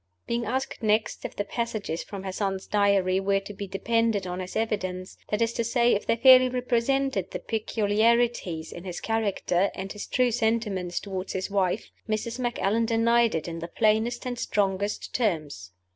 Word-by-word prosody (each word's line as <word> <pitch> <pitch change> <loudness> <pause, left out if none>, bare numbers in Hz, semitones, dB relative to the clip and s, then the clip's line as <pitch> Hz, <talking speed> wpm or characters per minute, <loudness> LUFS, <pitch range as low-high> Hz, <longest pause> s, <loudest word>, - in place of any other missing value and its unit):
Being 235 0 -1
asked 260 +3 -2
next 215 0 0
if - - -6
the 205 - -1
passages 215 -8 -3
from 195 -2 -8
her 190 - -3
son's 195 0 -2
Diary 200 -2 +2
were 195 0 +2
to 200 +1 -9
be 200 0 -6
depended 225 +1 0
on 180 0 -4
as 185 - -7
evidence 185 -4 -2
that 210 +2 +1
is 230 0 -1
to 235 - -1
say, 235 +1 +3
if 205 - -1
they - - +3
fairly 255 +1 +7
represented 250 -3 0
the - - -4
peculiarities 220 -5 +1
in 175 - -8
his 180 -2 -5
character, 200 -4 0
and 195 0 -5
his 210 - -7
true 250 -1 +2
sentiments 220 -6 0
toward 190 -1 -5
his 190 +1 -3
wife 195 +1 0 0.2
Mrs. 230 +3 -2
Macallan 230 -2 0
denied 235 -1 +3
it 160 - -2
in 165 -1 -5
the 170 - -5
plainest 220 +6 +1
and 245 -1 -3
strongest 200 0 -1
terms. 155 - -1
210 Hz, 175 wpm, -26 LUFS, 190-235 Hz, 0.2 s, fairly